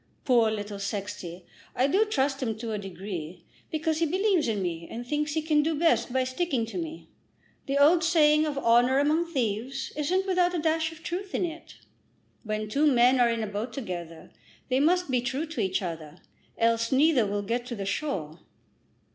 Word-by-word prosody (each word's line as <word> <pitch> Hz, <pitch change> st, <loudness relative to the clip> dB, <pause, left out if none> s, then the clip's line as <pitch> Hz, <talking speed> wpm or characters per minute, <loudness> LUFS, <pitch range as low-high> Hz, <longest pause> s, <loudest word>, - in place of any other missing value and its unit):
Poor 235 Hz, -4 st, +4 dB
little 205 Hz, -1 st, -4 dB
Sexty! 190 Hz, -3 st, -5 dB, 0.3 s
I 255 Hz, -, +3 dB
do 385 Hz, +10 st, +3 dB
trust 275 Hz, -8 st, 0 dB
him 225 Hz, -4 st, -2 dB
to 225 Hz, 0 st, -5 dB
a 210 Hz, -, -2 dB
degree, 180 Hz, -3 st, -7 dB, 0.3 s
because 315 Hz, 0 st, -1 dB
he 335 Hz, -, +2 dB
believes 375 Hz, -, +1 dB
in 215 Hz, -3 st, 0 dB
me 170 Hz, -3 st, -3 dB
and 240 Hz, +1 st, -6 dB
thinks 295 Hz, +3 st, -1 dB
he 315 Hz, -, 0 dB
can 305 Hz, -1 st, +3 dB
do 315 Hz, +1 st, 0 dB
best 325 Hz, -4 st, +2 dB
by 260 Hz, +1 st, +1 dB
sticking 255 Hz, -2 st, -1 dB
to 225 Hz, -, -7 dB
me. 325 Hz, -1 st, -6 dB, 0.6 s
The 275 Hz, +1 st, 0 dB
old 320 Hz, +4 st, +5 dB
saying 310 Hz, -2 st, +4 dB
of 290 Hz, -2 st, -3 dB
'honour 245 Hz, +1 st, +4 dB
among 315 Hz, +4 st, +1 dB
thieves' 260 Hz, +1 st, -2 dB
isn't 360 Hz, +6 st, 0 dB
without 360 Hz, -2 st, +2 dB
a -, -, +1 dB
dash 320 Hz, 0 st, 0 dB
of 320 Hz, 0 st, -14 dB
truth 375 Hz, +3 st, -4 dB
in -, -, +1 dB
it. 335 Hz, -1 st, -8 dB, 0.7 s
When 215 Hz, -1 st, -3 dB
two 285 Hz, +8 st, +2 dB
men 250 Hz, +1 st, +4 dB
are 240 Hz, -1 st, +5 dB
in 230 Hz, -1 st, -1 dB
a -, -, -3 dB
boat 210 Hz, +4 st, -4 dB
together 175 Hz, -9 st, -7 dB, 0.4 s
they 255 Hz, +1 st, +2 dB
must 350 Hz, +1 st, +2 dB
be 250 Hz, -1 st, +2 dB
true 265 Hz, +6 st, -2 dB
to 315 Hz, -7 st, -4 dB
each 190 Hz, 0 st, 0 dB
other, 165 Hz, -2 st, -6 dB, 0.4 s
else 230 Hz, 0 st, +1 dB
neither 270 Hz, -4 st, +4 dB
will 205 Hz, 0 st, -2 dB
get 240 Hz, +4 st, -2 dB
to 240 Hz, -, -4 dB
the 200 Hz, -2 st, -5 dB
shore." 180 Hz, -, -3 dB
260 Hz, 195 wpm, -27 LUFS, 215-315 Hz, 0.7 s, old